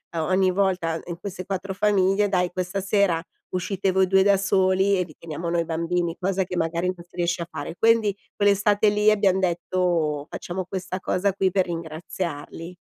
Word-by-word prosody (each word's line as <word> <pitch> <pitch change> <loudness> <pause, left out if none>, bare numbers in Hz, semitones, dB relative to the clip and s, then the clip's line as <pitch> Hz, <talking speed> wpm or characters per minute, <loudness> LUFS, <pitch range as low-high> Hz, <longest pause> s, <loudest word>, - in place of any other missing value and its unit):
o 165 - 0
ogni 185 0 +3
volta 180 -4 0
in 170 -1 -6
queste 185 -1 -6
4 195 0 -3
famiglie: 200 0 +2
"Dai 180 -2 +1
questa 185 +2 -3
sera 195 -3 +2 0.3
uscite 190 +1 -1
voi 190 0 +3
2 190 +1 +4
da 200 0 +4
soli 190 0 +2
e 180 - +1
vi 165 -3 -13
teniamo 165 +1 -5
noi 170 0 0
bambini." 170 +1 -1
Cosa 190 0 0
che 180 0 -5
magari 170 +1 -1
non 175 - -12
si 175 - -20
riesce 175 0 0
a 170 - -4
fare. 145 +3 -6
Quindi 225 -3 +3 0.2
quell'estate 205 +1 +3
lì 210 +1 +3
abbiam 200 -3 +3
detto: 170 -4 0
"Facciamo 185 +2 -4
questa 185 0 -5
cosa 195 +1 0
qui 190 0 +1
per 190 0 +2
ringraziarli." 165 0 -6
185 Hz, 180 wpm, -24 LUFS, 170-195 Hz, 0.3 s, 2